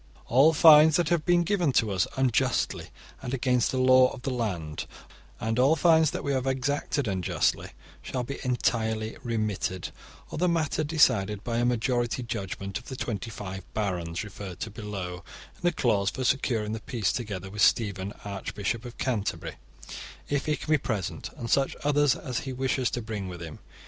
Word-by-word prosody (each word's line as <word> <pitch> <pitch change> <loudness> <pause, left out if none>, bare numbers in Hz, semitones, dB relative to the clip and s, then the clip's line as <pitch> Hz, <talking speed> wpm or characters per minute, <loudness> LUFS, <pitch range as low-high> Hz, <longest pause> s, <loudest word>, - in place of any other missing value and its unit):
* - - -27
All 140 +5 +7
fines 155 -1 +8
that 170 -3 +2
have 170 -3 +1
been 175 -1 +4
given 175 -4 +1
to 110 -4 +2
us 95 -1 +1
unjustly 130 -3 +1 0.3
and 130 0 -3
against 125 -2 +1
the 130 - -2
law 130 0 +6
of 125 - -9
the 135 - -2
land, 90 -11 -3 0.5
and 115 +1 -1
all 135 +5 +5
fines 160 -2 +4
that - - -5
we 140 - -1
have 130 -1 -1
exacted 135 +1 -1
unjustly, 95 -3 0 0.3
shall 125 -2 -3
be 140 +3 -6
entirely 110 -3 0
remitted 110 -6 -2 0.4
or - - -4
the 180 +1 +3
matter 160 -2 0
decided 105 -10 +2
by 115 -1 -2
a 120 - +2
majority 120 +1 0
judgement 100 -3 -4
of 125 - -18
the 130 - -7
twenty 115 -2 -4
five 95 -3 -7
barons 90 -5 -2
referred 100 -3 -8
to 110 - -4
below 100 -4 -5 0.4
in - - -23
the 175 - +2
clause 110 - +1
for 130 - -4
securing 120 -4 0
the 110 - -3
peace 110 -3 -1
together 100 -5 -5
with 105 +1 -4
Stephen, 100 -4 +2
archbishop 100 +3 -3
of 120 - -9
Canterbury, 115 -7 -2 0.7
if 145 +1 -1
he 150 - +2
can 155 - -5
be 155 - +5
present, 105 -8 -3
and 115 - -5
such 135 +3 +2
others 145 -2 +3
as 125 -4 -4
he 135 - -5
wishes 130 -1 0
to 120 - -4
bring 105 -4 -4
with 90 -1 -7
him. 80 -2 -8
120 Hz, 185 wpm, -27 LUFS, 100-135 Hz, 0.7 s, fines